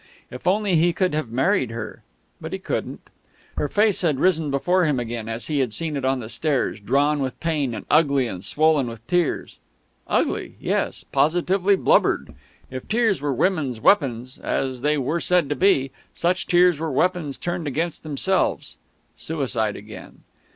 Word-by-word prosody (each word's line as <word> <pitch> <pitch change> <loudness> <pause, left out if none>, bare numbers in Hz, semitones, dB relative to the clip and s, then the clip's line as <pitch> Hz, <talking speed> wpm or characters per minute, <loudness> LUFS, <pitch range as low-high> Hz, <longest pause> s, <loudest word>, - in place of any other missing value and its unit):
If 125 +7 -8
only 195 -1 +2
he 170 +2 +3
could 180 0 0
have 150 -6 -2
married 135 - +1
her!... 115 -1 -7 0.4
But - - -6
he - - -1
couldn't. - - -4 0.5
Her 150 - -1
face 210 -1 +2
had 155 -7 +1
risen 165 -4 +2
before 175 +7 +2
him 145 -5 +1
again 115 -1 -4
as 115 -1 -4
he 150 +1 -1
had 125 -5 -1
seen 160 -2 -3
it 140 - -3
on 130 0 +1
the 110 - -6
stairs, 140 -1 -1
drawn 145 +7 +1
with 130 -2 -3
pain 150 -7 -1
and - - -7
ugly 140 -4 +3
and 95 -5 -6
swollen 150 +4 +2
with 115 -1 -9
tears. 175 +1 -1 0.5
Ugly - - -1
yes, - - -2
positively 180 +5 +2
blubbered; - - +2 0.4
if 130 -1 -7
tears 220 - +1
were 145 -1 -1
women's 140 - 0
weapons, 130 - +2
as 130 -2 -2
they 150 +2 +1
were 145 +5 -1
said 175 -4 +2
to 145 - 0
be, 140 -9 +2 0.2
such 180 +2 0
tears 175 -3 +4
were 160 -1 -2
weapons 160 0 0
turned 175 -2 -3
against 160 +4 -2
themselves... 160 +5 -1 0.4
suicide 120 -9 -2
again.... 105 +1 -11
150 Hz, 170 wpm, -23 LUFS, 130-175 Hz, 0.5 s, tears